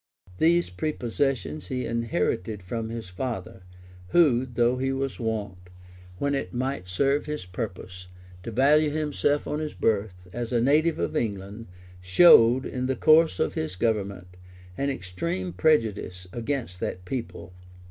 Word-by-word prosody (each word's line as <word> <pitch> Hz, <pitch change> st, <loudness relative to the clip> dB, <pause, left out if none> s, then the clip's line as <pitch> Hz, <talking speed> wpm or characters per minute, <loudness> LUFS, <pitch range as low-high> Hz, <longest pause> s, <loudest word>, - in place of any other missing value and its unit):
These 170 Hz, -, +3 dB
prepossessions 135 Hz, +5 st, -2 dB
he 125 Hz, -2 st, -3 dB
inherited 110 Hz, -3 st, -1 dB
from 110 Hz, +4 st, -4 dB
his 115 Hz, -5 st, -6 dB
father; 95 Hz, -2 st, -5 dB, 0.5 s
who, 130 Hz, -, +4 dB
though 120 Hz, 0 st, +1 dB
he 135 Hz, +1 st, 0 dB
was 135 Hz, 0 st, -3 dB
wont, 105 Hz, -5 st, -3 dB, 0.6 s
when 140 Hz, +5 st, 0 dB
it 135 Hz, -2 st, -3 dB
might 130 Hz, -6 st, -2 dB
serve 140 Hz, +11 st, +1 dB
his 150 Hz, -10 st, -4 dB
purpose, 90 Hz, -1 st, -7 dB, 0.3 s
to 105 Hz, -, -6 dB
value 145 Hz, +6 st, +4 dB
himself 145 Hz, -1 st, 0 dB
on 150 Hz, -, -2 dB
his 155 Hz, -1 st, -4 dB
birth, 100 Hz, -4 st, -1 dB
as 120 Hz, +1 st, -4 dB
a 120 Hz, -, +2 dB
native 150 Hz, +6 st, +3 dB
of -, -, -2 dB
England,[] 100 Hz, +1 st, -3 dB, 0.3 s
showed, 120 Hz, -, +6 dB
in 125 Hz, 0 st, -3 dB
the 130 Hz, -, 0 dB
course 155 Hz, -, +5 dB
of -, -, 0 dB
his 80 Hz, +3 st, -3 dB
government, 100 Hz, -4 st, -2 dB, 0.4 s
an 140 Hz, +6 st, -1 dB
extreme 90 Hz, -5 st, -4 dB
prejudice 100 Hz, -, +1 dB
against 120 Hz, -6 st, -3 dB
that 90 Hz, 0 st, -4 dB
people. 115 Hz, -5 st, -6 dB
115 Hz, 140 wpm, -26 LUFS, 95-140 Hz, 0.6 s, showed